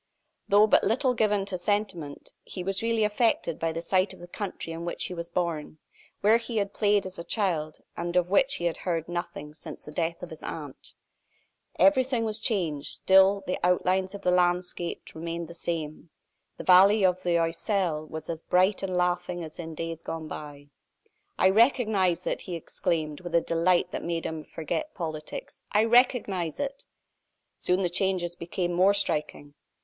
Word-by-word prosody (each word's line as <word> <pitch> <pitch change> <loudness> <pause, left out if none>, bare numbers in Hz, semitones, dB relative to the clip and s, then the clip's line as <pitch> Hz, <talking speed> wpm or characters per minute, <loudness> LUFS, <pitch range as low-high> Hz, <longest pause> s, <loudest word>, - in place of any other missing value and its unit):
Though 205 +1 +6
but 215 - +4
little 250 +5 +2
given 210 -4 +1
to 190 -2 -4
sentiment, 175 -6 -2
he 180 - -7
was 195 +1 -1
really 230 -1 +1
affected 210 -6 +1
by 165 0 0
the 165 +1 -4
sight 185 +2 +1
of - - -18
the 175 - -10
country 180 -3 -5
in 165 +1 -6
which 170 - -2
he - - -4
was 170 -1 -6
born 170 -4 -2 0.4
where 215 +3 +5
he 230 0 -5
had 200 -1 -1
played 205 -2 +2
as 185 -1 -8
a - - -4
child, 170 -7 -1 0.2
and 175 +1 -4
of 180 0 +2
which 270 +6 +4
he 175 - -3
had 170 - 0
heard 165 -3 -2
nothing 175 -4 -5
since 155 -1 -10
the 150 - -9
death 165 +2 -2
of 175 - -7
his 160 - -10
aunt. - - -8 0.8
Everything 260 -4 +3
was 215 0 0
changed: 175 - -1
still 190 +1 +5
the 180 - -2
outlines 185 +2 +1
of 200 - -9
the 180 - +3
landscape 175 -1 0
remained 165 +1 -5
the 170 - -10
same; 165 -1 -4 0.5
the - - -6
valley 195 +3 +6
of 185 0 +2
the 175 -2 +2
Oiselle 165 -1 0
was 155 0 -7
as 165 -1 -4
bright 185 +4 +2
and 185 -2 -2
laughing 180 0 0
as 155 +1 -9
in 165 -2 -6
days 165 0 -5
gone 165 -1 -5
by. 145 -1 -9 0.7
"I 190 - +5
recognize 210 - +3
it!" - - -2
he 180 - -5
exclaimed, 160 -2 -2
with 175 -1 -4
a - - +7
delight 170 +2 +2
that - - -4
made 170 -1 -2
him 160 -1 -3
forget 165 - -4
politics. 155 -4 -6
"I 210 +1 +5
recognize 225 - +2
it!" 275 -1 -4 0.7
Soon 180 +2 0
the - - +2
changes 175 -1 0
became 175 +1 -3
more 190 +3 +4
striking. 150 -6 -2
180 Hz, 180 wpm, -27 LUFS, 165-200 Hz, 0.8 s, a